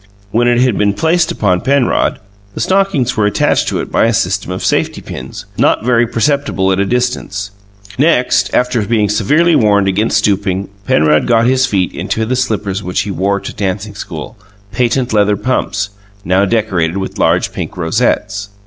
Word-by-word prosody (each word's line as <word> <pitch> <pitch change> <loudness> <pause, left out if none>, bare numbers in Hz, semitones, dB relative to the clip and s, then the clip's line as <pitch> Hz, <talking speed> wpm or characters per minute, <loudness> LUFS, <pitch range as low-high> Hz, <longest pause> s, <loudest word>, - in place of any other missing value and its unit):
When 120 +3 +2
it 120 0 +3
had 125 -4 +1
been 100 -1 +2
placed 165 - +1
upon 90 -4 0
Penrod, 135 -1 +1 0.4
the - - -5
stockings 190 -10 +1
were 105 -2 +2
attached 105 - +1
to - - -1
it - - -8
by - - +3
a 115 - +2
system 95 -3 -1
of 90 - -4
safety - - 0
pins, - - -8
not - - +2
very 120 -1 +3
perceptible 120 -6 0
at 95 - 0
a 100 - +1
distance. 120 -5 -2 0.5
Next, 145 -4 +2
after 125 -2 +1
being 105 -1 +1
severely 150 +12 +2
warned 100 -4 +3
against 105 +4 +1
stooping, 100 -1 0 0.2
Penrod 75 0 +3
got 115 -1 +3
his 130 +1 +2
feet 95 -6 -1
into 110 - -2
the 130 +3 -1
slippers 105 -6 -2 0.2
he 105 - -4
wore 100 +3 0
to - - -7
dancing 100 +1 -3
school 100 +2 -8 0.3
"patent 125 0 0
leather 105 -1 +3
pumps" 100 -3 -2 0.3
now 95 +2 +2
decorated 95 -6 0
with 95 -1 -5
large - - +1
pink - - -6
rosettes. 100 +2 -1
105 Hz, 170 wpm, -14 LUFS, 100-125 Hz, 0.5 s, it